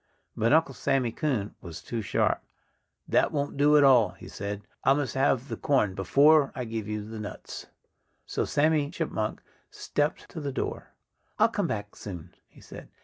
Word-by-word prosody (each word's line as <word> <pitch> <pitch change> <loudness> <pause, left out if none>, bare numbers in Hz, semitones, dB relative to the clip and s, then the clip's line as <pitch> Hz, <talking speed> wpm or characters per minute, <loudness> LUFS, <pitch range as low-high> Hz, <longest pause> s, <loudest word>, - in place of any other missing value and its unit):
But 115 +2 +1
Uncle 155 -3 +4
Sammy 135 -3 0
Coon 120 -7 -2
was 85 -3 -9
too 115 -1 -3
sharp. 100 - +1 0.7
"That - - +3
won't 145 -1 -2
do 145 +2 +5
at 145 - +6
all," 125 -5 +5
he - - -13
said. 100 0 -5 0.2
"I 135 - +5
must 140 -5 -2
have 135 -1 +1
the 115 - -4
corn 130 -8 +1
before 140 - +4
I 125 -3 -3
give 110 -2 -4
you 105 -1 -4
the 110 0 -7
nuts." 105 - -8 0.6
So - - -1
Sandy 150 -1 +2
Chipmunk 150 -10 -3 0.3
stepped 150 +2 -2
to 165 - -7
the 140 -1 -3
door. - - -5 0.4
"I'll - - +5
come - - -1
back 105 0 -4
soon," 90 -4 -8
he - - -19
said. - - -11
130 Hz, 175 wpm, -27 LUFS, 105-145 Hz, 0.7 s, at